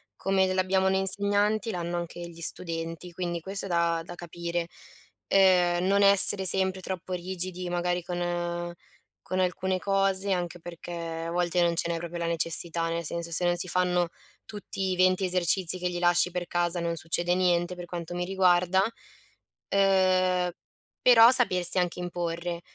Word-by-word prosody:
Come 190 Hz, -1 st, 0 dB
l'abbiamo 190 Hz, 0 st, 0 dB
noi 190 Hz, 0 st, +1 dB
insegnanti, 205 Hz, +3 st, +1 dB
l'hanno 175 Hz, -3 st, -4 dB
anche 170 Hz, 0 st, -7 dB
gli 170 Hz, -1 st, -10 dB
studenti, 165 Hz, 0 st, -4 dB
quindi 175 Hz, -1 st, -5 dB
questo 195 Hz, +4 st, -4 dB
è -, -, -6 dB
da 170 Hz, -1 st, 0 dB
da 175 Hz, -, -10 dB
capire. 170 Hz, 0 st, -5 dB, 0.6 s
Ehm, 180 Hz, -2 st, +3 dB
non 200 Hz, +1 st, +2 dB
essere 200 Hz, 0 st, +9 dB
sempre 190 Hz, 0 st, +3 dB
troppo 185 Hz, 0 st, -7 dB
rigidi 180 Hz, 0 st, -5 dB
magari 175 Hz, 0 st, -2 dB
con 175 Hz, 0 st, -4 dB, 0.5 s
con 185 Hz, -, -4 dB
alcune 185 Hz, 0 st, -1 dB
cose, 195 Hz, 0 st, 0 dB
anche 175 Hz, -1 st, -4 dB
perché 170 Hz, +1 st, -10 dB, 0.4 s
a -, -, -5 dB
volte 175 Hz, 0 st, 0 dB
non 170 Hz, -1 st, +1 dB
ce 170 Hz, -, -1 dB
n'è 170 Hz, -, -2 dB
proprio 170 Hz, +1 st, -7 dB
la 170 Hz, -, -3 dB
necessità, 165 Hz, 0 st, -1 dB
nel 170 Hz, 0 st, -4 dB
senso 170 Hz, +2 st, -4 dB
se 170 Hz, +2 st, +2 dB
non 175 Hz, 0 st, +1 dB
si 175 Hz, +1 st, -3 dB
fanno 180 Hz, -1 st, 0 dB, 0.4 s
tutti 195 Hz, -2 st, -5 dB
i -, -, -1 dB
20 185 Hz, +1 st, +2 dB
esercizi 180 Hz, 0 st, +1 dB
che 180 Hz, 0 st, -2 dB
gli 175 Hz, -, -5 dB
lasci 175 Hz, 0 st, +2 dB
per 180 Hz, 0 st, -5 dB
casa 175 Hz, 0 st, -1 dB
non 170 Hz, 0 st, -3 dB
succede 175 Hz, +2 st, +1 dB
niente 180 Hz, -1 st, 0 dB
per 175 Hz, 0 st, -9 dB
quanto 175 Hz, -1 st, -7 dB
mi 175 Hz, 0 st, -3 dB
riguarda, 185 Hz, 0 st, +2 dB, 0.9 s
ehm, 185 Hz, -2 st, +1 dB, 0.5 s
però 235 Hz, -1 st, +7 dB
sapersi 185 Hz, -8 st, +4 dB
anche 180 Hz, 0 st, -2 dB
imporre, 175 Hz, -1 st, -5 dB
180 Hz, 165 wpm, -26 LUFS, 170-190 Hz, 0.9 s, essere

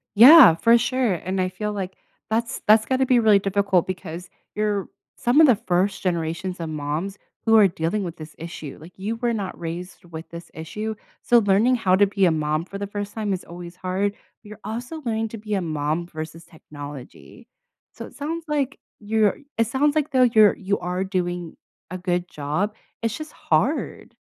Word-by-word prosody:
Yeah, 260 Hz, -, +10 dB
for 230 Hz, +7 st, +5 dB
sure, 245 Hz, -2 st, +1 dB
and 185 Hz, +3 st, -3 dB
I 185 Hz, 0 st, +1 dB
feel 210 Hz, +3 st, -4 dB
like 190 Hz, -2 st, -5 dB, 0.3 s
that's 230 Hz, +1 st, -1 dB
that's 215 Hz, +1 st, +6 dB
gotta 260 Hz, +1 st, +1 dB
be 250 Hz, -1 st, +4 dB
really 215 Hz, -3 st, +5 dB
difficult 195 Hz, -2 st, +1 dB
because 180 Hz, -1 st, -6 dB, 0.3 s
you're 210 Hz, -2 st, -1 dB, 0.3 s
some 250 Hz, +6 st, +3 dB
of 315 Hz, -, +8 dB
the 250 Hz, -, +6 dB
first 190 Hz, 0 st, 0 dB
generations 170 Hz, +1 st, -2 dB
of 165 Hz, -1 st, -4 dB
moms 155 Hz, +6 st, -3 dB, 0.3 s
who 225 Hz, -1 st, +5 dB
are 210 Hz, -2 st, +7 dB
dealing 170 Hz, +4 st, -2 dB
with 175 Hz, -1 st, -6 dB
this 155 Hz, 0 st, -10 dB
issue, 165 Hz, -3 st, -8 dB
like 170 Hz, +3 st, -13 dB
you 205 Hz, +4 st, -3 dB
were 235 Hz, 0 st, 0 dB
not 200 Hz, -4 st, -4 dB
raised 175 Hz, +2 st, -6 dB
with 165 Hz, -1 st, -9 dB
this 170 Hz, 0 st, -10 dB
issue, 210 Hz, +8 st, -5 dB, 0.3 s
so 240 Hz, -, +5 dB
learning 210 Hz, +4 st, +3 dB
how 190 Hz, -6 st, +2 dB
to 205 Hz, +2 st, +5 dB
be 195 Hz, -1 st, +1 dB
a 175 Hz, -, +4 dB
mom 155 Hz, +1 st, -1 dB
for 195 Hz, -, -8 dB
the 200 Hz, 0 st, -4 dB
first 205 Hz, 0 st, -5 dB
time 210 Hz, -3 st, -2 dB
is 185 Hz, -, -4 dB
always 175 Hz, 0 st, -10 dB
hard. 185 Hz, +2 st, -1 dB, 0.3 s
You're 210 Hz, 0 st, -12 dB
also 245 Hz, +9 st, -6 dB
learning 225 Hz, -1 st, -1 dB
to 225 Hz, -, -7 dB
be 210 Hz, 0 st, -5 dB
a 195 Hz, -, 0 dB
mom 155 Hz, +1 st, -2 dB
versus 160 Hz, 0 st, -8 dB
technology 145 Hz, -4 st, -11 dB, 0.4 s
so -, -, -9 dB
it -, -, -14 dB
sounds 325 Hz, +3 st, -4 dB
like 285 Hz, -2 st, -1 dB, 0.2 s
you're 215 Hz, -1 st, +1 dB, 0.2 s
it 230 Hz, -1 st, +2 dB
sounds 285 Hz, +5 st, +1 dB
like, 300 Hz, -1 st, 0 dB
though, 255 Hz, -2 st, +4 dB
you're 215 Hz, -2 st, +6 dB
you 195 Hz, +1 st, -2 dB
are 180 Hz, +1 st, -2 dB
doing 175 Hz, -3 st, -3 dB, 0.4 s
a 185 Hz, -, -4 dB
good 180 Hz, -1 st, -1 dB
job, 155 Hz, +9 st, -2 dB, 0.3 s
it's 230 Hz, 0 st, -2 dB
just 310 Hz, 0 st, -8 dB
hard. -, -, -1 dB
195 Hz, 195 wpm, -23 LUFS, 175-220 Hz, 0.4 s, Yeah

